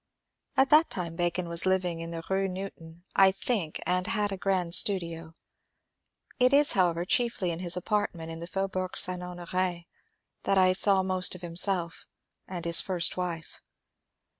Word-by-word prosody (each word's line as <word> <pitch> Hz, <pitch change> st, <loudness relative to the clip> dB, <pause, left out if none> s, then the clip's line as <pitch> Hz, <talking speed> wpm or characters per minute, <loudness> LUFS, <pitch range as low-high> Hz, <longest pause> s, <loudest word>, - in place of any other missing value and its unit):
At 270 Hz, 0 st, +3 dB
that 310 Hz, +2 st, +5 dB
time 170 Hz, -3 st, -5 dB
Bacon 175 Hz, 0 st, -2 dB
was 170 Hz, +2 st, +2 dB
living 180 Hz, -3 st, 0 dB
in 165 Hz, 0 st, -6 dB
the 165 Hz, -1 st, -7 dB
Rue 195 Hz, 0 st, 0 dB
Newton, 175 Hz, -3 st, -9 dB
I 190 Hz, 0 st, +6 dB
think, 190 Hz, -5 st, -3 dB
and 180 Hz, 0 st, 0 dB
had 210 Hz, -2 st, -1 dB
a -, -, -3 dB
grand 185 Hz, -3 st, -1 dB
studio. 165 Hz, -5 st, +2 dB, 1.0 s
It 250 Hz, +1 st, +4 dB
is, 285 Hz, +1 st, +5 dB
however, 175 Hz, -2 st, +1 dB
chiefly 230 Hz, -4 st, 0 dB
in 165 Hz, -, -5 dB
his 180 Hz, -1 st, +1 dB
apartment 180 Hz, -4 st, -3 dB
in 165 Hz, -, -8 dB
the 170 Hz, -, -7 dB
Faubourg 185 Hz, 0 st, -4 dB
St. 180 Hz, -1 st, +1 dB
Honor^ 180 Hz, 0 st, -4 dB, 0.6 s
that 195 Hz, -, 0 dB
I 185 Hz, -1 st, +4 dB
saw 195 Hz, 0 st, +3 dB
most 185 Hz, -1 st, -2 dB
of 180 Hz, -, -11 dB
himself 175 Hz, 0 st, 0 dB, 0.4 s
and 175 Hz, -2 st, -7 dB
his 170 Hz, 0 st, +5 dB
(first) 180 Hz, -4 st, +2 dB
wife. 170 Hz, -3 st, -6 dB
180 Hz, 165 wpm, -27 LUFS, 170-195 Hz, 1.0 s, I